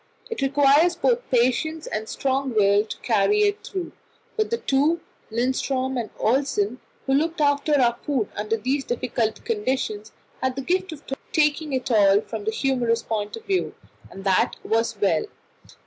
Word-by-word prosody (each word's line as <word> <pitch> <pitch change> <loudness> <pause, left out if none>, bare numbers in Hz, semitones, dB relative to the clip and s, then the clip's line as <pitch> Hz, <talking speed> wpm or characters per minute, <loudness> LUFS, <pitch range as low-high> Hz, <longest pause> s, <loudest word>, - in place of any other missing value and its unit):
It 455 - -3
requires 285 +5 +4
both 485 +6 0
patience 260 +6 +1
and 220 +1 -4
strong 265 -2 -1
will 200 0 +4
to - - -7
carry 420 0 +3
it 410 0 0
through, 370 -3 -5 0.4
but 435 -1 0
the 465 - 0
two 300 0 +1 0.3
Lindström 260 +2 0
and 220 - -8
Olsen 250 -2 0 0.3
who 270 - +1
looked 320 +4 +1
after 290 0 +2
our 240 -2 +3
food 260 -8 0
under 215 +2 -1
these 265 +6 -1
difficult 235 - -2
conditions, 260 - -2 0.3
had 260 -1 0
the 270 - -4
gift 370 +4 0
of 310 - -9 0.3
taking 300 0 +1
it 260 -1 -2
all 200 -3 +5
from 220 -2 -7
the 220 - +1
humorous 240 -2 0
point 210 -2 -3
of 455 - -11
view, 380 -2 -1 0.3
and 195 - -10
that 190 -2 +2
was 225 -1 0
well. 200 - +2
265 Hz, 165 wpm, -24 LUFS, 225-310 Hz, 0.4 s, all